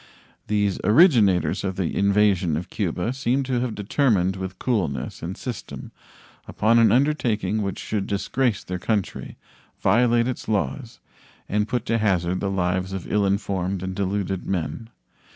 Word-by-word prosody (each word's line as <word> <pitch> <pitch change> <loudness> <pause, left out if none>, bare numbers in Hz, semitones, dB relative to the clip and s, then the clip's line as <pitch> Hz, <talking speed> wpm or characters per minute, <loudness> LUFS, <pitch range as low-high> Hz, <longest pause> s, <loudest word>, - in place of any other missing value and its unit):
These 105 -2 0
originators 105 - +4
of 95 -1 -2
the 90 -3 -2
invasion 100 -5 +2
of 85 - -6
Cuba 100 +2 -2
seem 135 0 0
to 130 -2 -1
have 120 -2 -2
determined 105 -4 +1
with 95 -1 -6
coolness 85 - -2
and 85 +3 -5
system 125 -5 -7 0.6
upon 115 +2 +3
an 115 - +5
undertaking 115 -7 +1
which 100 -2 -3
should 105 -3 -3
disgrace 110 +3 -1
their 90 0 -5
country, 105 0 -2 0.4
violate 120 0 +3
its 130 - -4
laws, 110 +1 -2 0.5
and 105 +1 0
put 120 +1 -2
to 115 -1 +1
hazard 90 -4 +1
the 100 - -1
lives 95 0 -1
of 95 -3 -6
ill 105 -1 +2
informed 95 -2 -1
and 95 0 -3
deluded 95 -1 -2
men. 95 +5 -3
100 Hz, 150 wpm, -23 LUFS, 95-115 Hz, 0.6 s, an